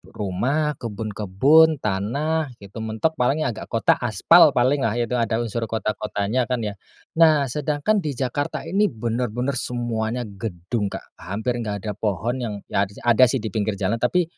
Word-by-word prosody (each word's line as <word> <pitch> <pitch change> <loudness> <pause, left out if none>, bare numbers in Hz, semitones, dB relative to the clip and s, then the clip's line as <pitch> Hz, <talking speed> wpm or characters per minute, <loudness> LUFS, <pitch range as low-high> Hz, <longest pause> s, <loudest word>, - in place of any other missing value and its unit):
rumah, 130 +10 0
kebun-kebun, 110 +8 +3
tanah 130 +9 -1
gitu 100 +1 -11
mentok. 110 +9 -2
Paling 140 +5 +2
ya 120 - 0
agak 110 - -8
kota, 115 -1 +2
aspal 135 - +5
paling 130 +4 +3
lah, 115 -3 0
itu 120 +1 0
ada 115 0 0
unsur 115 0 -3
kota-kotanya 110 +1 -1
kan, 125 -3 -1
ya. 105 - -2 0.5
Nah, 155 -5 +5
sedangkan 150 - 0
di 150 -7 -3
Jakarta 135 +3 -2
ini 195 +6 +2
bener-bener 120 - -2
semuanya 120 0 -2
gedung, 100 0 -4
Kak. - - -6 0.2
Hampir 110 +5 -3
enggak 105 -4 -4
ada 105 - -2
pohon 110 +5 -2
yang, 115 -4 -3 0.2
ya 100 0 +2 0.2
ada 120 +1 +5
sih 125 -2 -1
di 110 - -3
pinggir 105 0 -1
jalan, 105 +4 -1
tapi 175 +10 +2
120 Hz, 165 wpm, -23 LUFS, 105-140 Hz, 0.5 s, aspal